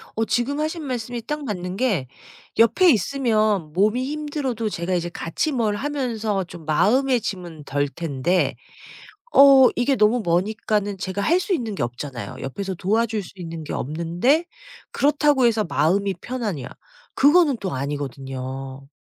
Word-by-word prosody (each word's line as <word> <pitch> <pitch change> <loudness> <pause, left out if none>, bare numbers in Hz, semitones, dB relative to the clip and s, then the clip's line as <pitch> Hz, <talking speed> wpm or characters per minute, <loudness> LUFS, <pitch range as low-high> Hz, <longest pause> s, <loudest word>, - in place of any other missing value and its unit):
어 225 - 0
지금 255 +6 0
하신 310 +1 -2
말씀이 245 -2 -4
딱 300 +2 -3
맞는 180 -3 -4
게 205 - 0 0.5
옆에 335 - +5
있으면 215 - +1
몸이 215 +7 +2
힘들어도 290 -6 -3
제가 180 -1 -3
이제 175 -1 -1
같이 170 - -2
뭘 220 -4 0
하면서 225 -7 -2
좀 170 -2 -12
마음의 245 - +2
짐은 175 -6 -6
덜 145 0 -1
텐데 165 +3 -1 0.8
어 270 -2 +8
이게 260 +2 +1
너무 220 +3 +3
머니까는 205 +3 0
제가 190 +1 -3
할 335 - +3
수 380 - -2
있는 230 - -3
게 - - -3
없잖아요. 130 +1 -6
옆에서 190 +8 -4
도와줄 215 +3 0
수 180 - -12
있는 165 -2 -7
게 - - -6
없는데 170 - 0 0.5
그렇다고 285 -3 +3
해서 225 -2 +2
마음이 175 +7 +1
편하냐. 210 - -4 0.5
그거는 295 -1 +5
또 190 -3 -3
아니거든요. 135 -1 -5
210 Hz, 305 characters per minute, -23 LUFS, 165-255 Hz, 0.8 s, 어